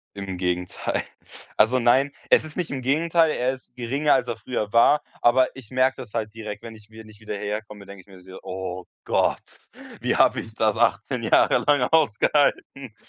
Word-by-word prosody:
Im 95 -2 -6
Gegenteil. 90 0 -2 0.5
Also, 115 +4 +4
nein, 130 +4 +3 0.2
es - - +4
ist 155 - -11
nicht 180 -3 -3
im 135 -2 -4
Gegenteil, 160 +4 +2
er 125 -2 0
ist 130 -2 -11
geringer, 135 +5 +1
als 165 - +1
er 115 - -3
früher 110 -2 -4
war, 120 +6 +5 0.2
aber 130 +2 +3
ich 125 -5 -12
merke 130 +1 +2
das 120 -5 -10
halt 110 -2 -3
direkt, 110 -2 -8
wenn 115 - -9
ich 105 -1 -17
wenn 110 0 -13
ich 105 -1 -16
wieder 105 -1 -6
hierher 105 +1 -3
komme, 105 -2 -13
denke 100 -1 -12
ich - - -28
mir 95 -2 -15
so: 95 +1 -12
„Oh 95 -1 -6 0.2
Gott, - - -1 0.4
wie - - 0
habe - - +3
ich 110 - -9
das 110 -2 +1
18 - - 0
Jahre - - +4
lang 145 -2 +4
ausgehalten?“ 140 -3 +1
115 Hz, 195 wpm, -23 LUFS, 105-130 Hz, 0.5 s, war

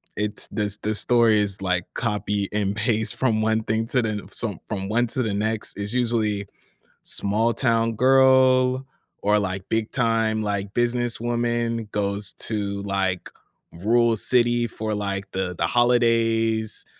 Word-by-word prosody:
it's 105 0 -3
this 105 -2 -2
the 105 +1 -2
story 115 -1 +4
is 100 -1 -2
like 90 -2 0
copy 105 -3 -1
and 100 -2 0
paste 110 0 0
from 115 -5 +1
one 110 0 +1
thing 110 +1 -1
to 125 +1 +1
the 110 -3 -3
some 105 -7 -4
from 95 -3 -3
one 120 +2 +2
to 130 +3 -2
the 110 -3 -2
next, 105 0 -2
is 100 +2 -4
usually 110 -5 0 0.6
small-town 115 +2 +1
girl, 130 +1 +4 0.4
or 105 +1 +3
like 95 -1 -4
big-time, 110 -1 0
like, 100 -1 -3
businesswoman 120 -1 -1
goes 100 -1 -2
to, 100 -2 -3
like, 95 -2 -1 0.4
rural 115 +6 +2
city 120 +1 +2
for, 110 -1 -4
like, 100 -1 -3
the 95 -1 -3
the - - +1
holidays, 115 -1 +2
110 Hz, 140 wpm, -23 LUFS, 100-120 Hz, 0.6 s, story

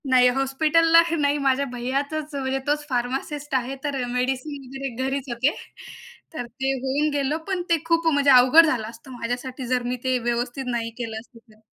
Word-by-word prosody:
नाही, 250 -1 +6
हॉस्पिटलला 315 +5 +4 0.2
नाही, 290 -1 +2
माझ्या 275 -1 +1
भैयाचंच, 280 +5 -3
म्हणजे 270 -1 -1
तोच 295 0 0
फार्मासिस्ट 270 +4 -3
आहे, 260 +1 -1
तर 280 -3 -2
मेडिसिन 265 +3 -2
वगैरे 270 +1 -5 0.2
घरीच 270 0 -3
होते. 245 +5 +1 0.8
तर 245 -6 -4
ते 265 +3 -3
होऊन 285 +3 +1
गेलं 285 +1 0
पण 380 -2 -1
ते 335 - +4
खूप 330 0 +1
म्हणजे 285 0 +3
अवघड 255 +6 +8
झालं 245 -8 -1
असतं 230 +3 -12
माझ्यासाठी, 250 +2 -4
जर 250 0 0
मी 245 +1 -2
ते 255 -1 +1
व्यवस्थित 240 +2 -2
नाही 230 -1 -2
केलं 225 -3 -4
असतं 230 +1 -16
तर. 215 0 -23
270 Hz, 175 wpm, -24 LUFS, 250-290 Hz, 0.8 s, अवघड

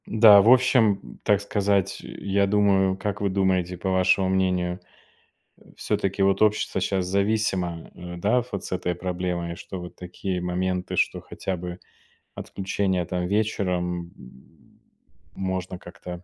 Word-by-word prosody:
Да, 105 -2 +8
в 110 - +4
общем, 120 -5 +4
м, - - -13
так 105 -2 +3
сказать, 100 -1 0
э, - - -9
я 100 0 0
думаю, 95 -2 +3
как 105 +1 -3
вы 100 - +1
думаете, 95 -2 0
по 95 +2 -2
вашему 95 +1 +3
мнению, 90 -1 0 0.8
э, - - -28 0.2
всё-таки, 100 0 -1
вот, 95 0 +2
общество 105 -2 +2
щас 95 -1 0
зависимо, 95 -3 -1
э, 85 0 -8
да, 110 +7 +2
вот 100 -1 -4
с - - -8
этой 90 -1 -1
проблемой, 90 -1 -3
что 95 +2 -8
вот 90 0 -9
такие 90 +1 -4
моменты, 90 +1 -2
что - - +1
хотя 95 - -4
бы, 90 0 -7 0.5
отключение 95 -2 -2
там 90 +1 -2
вечером, 90 -4 -1
м, 65 +1 -18 0.5
можно 95 -1 -3
как-то 90 0 -9
95 Hz, 150 wpm, -25 LUFS, 90-100 Hz, 0.8 s, Да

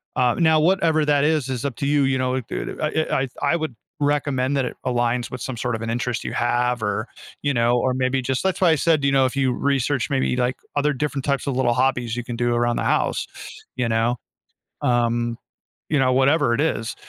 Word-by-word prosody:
uh, 125 -1 +2
now 160 -2 +4
whatever 160 -3 +2
that 145 -1 +3
is, 150 -4 +1
is 130 +1 -3
up 135 - -2
to 140 - -2
you. 145 -1 +3
You 135 0 +1
know 130 0 0
it 130 -3 -3
it - - -5 0.3
I - - +1
I - - -2 0.3
I - - +3
would 155 -7 -3 0.3
recommend 145 -2 +1
that 130 - +1
it - - -5
aligns 120 -1 0
with 125 - -5
some 130 - -4
sort 125 0 -1
of 115 - -6
an 115 - -4
interest 120 0 -2
you - - -4
have 120 -1 0
or, 105 +3 -1 0.3
you 145 - +1
know, 120 0 +2
or 130 0 +1
maybe 130 0 0
just 130 +4 -2
that's 190 -1 0
why 180 - +5
I - - +4
said, 155 -1 +2
you 140 - +3
know, 135 -1 +4
if 130 +2 -2
you 130 -2 +2
research 140 -2 0
maybe, 135 -2 +1
like, 125 0 0 0.2
other 145 +1 +2
different 140 0 -2
types 140 0 -1
of 135 - -1
little 125 -2 +2
hobbies 125 -2 0
you 120 - -3
can 120 -1 -5
do 120 0 0
around 120 0 +1
the - - -1
house, - - 0 0.5
you 125 -2 0
know, 115 +2 +1 0.7
um, 120 -1 +1 0.5
you 150 - +2
know, 130 -1 +3
whatever 135 0 +3
it 130 - +1
is. 115 -8 -1
130 Hz, 230 wpm, -22 LUFS, 120-140 Hz, 0.7 s, why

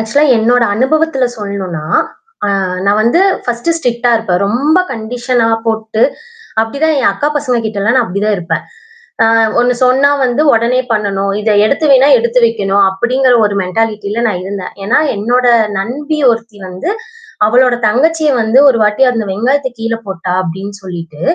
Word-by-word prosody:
Actually 280 +7 +1
என்னோட 240 +2 +2
அனுபவத்தில் 265 0 0
சொல்ணுனா, 190 -6 -5 1.0
நான் 205 +1 +2
வந்து 240 +11 +2 0.3
பர்ஸ்ட் 245 +7 -2
ஸ்ட்ரிக்ட்டா 245 -4 -1
இருப்பேன். 195 -5 -1
ரொம்ப 285 - +1
கண்டிஷன்லாம் 230 0 -1
போட்டு, 220 0 -2 0.6
அப்பிடிதான் 290 +7 -1
என் 240 - +3
அக்கா 285 +9 -1
பசங்ககிட்டலாம் 230 -5 -1
நான் 250 - +3
அப்பிடி 195 +1 -4
தான் 210 -1 +1
இருப்பேன். 170 -1 -3 0.8
ஆ - - +3 0.2
ஒண்ணு 245 +1 +2
சொன்னா 260 +3 +3
வந்து 250 +3 0
உடனே 235 +3 +1
பண்ணணும். 200 -2 -1
இத 220 - -1 0.2
எடுத்து 280 +7 0
வைன்னா, 270 +1 +5
எடுத்து 235 +2 +1
வைக்கணும். 200 -3 +1
அப்பிடிங்கிற 250 +6 +1
ஒரு 205 - -1
மென்டாலிட்டில 210 +3 -2
நான் 185 -5 -2
இருந்தேன். 195 -1 -6
ஏன்னா 215 +6 +1 0.2
என்னோட 245 +5 0 0.3
நண்பி 285 +10 -3
ஒருத்தி 230 -2 -3
வந்து, 185 - -5 0.6
அவளுடைய 245 +2 +2
தங்கச்சிய 310 +6 +1
வந்து 220 +3 +1
ஒருவாட்டி 220 0 +2
அந்த 225 -2 -2
வெங்காயத்த 260 +7 0
கீழே 230 0 -3
போட்டா! 185 -1 -5
அப்பிடின்னு 195 +3 -6
சொல்லிட்டு, 170 -4 -8
230 Hz, 145 wpm, -13 LUFS, 200-255 Hz, 1.0 s, வைன்னா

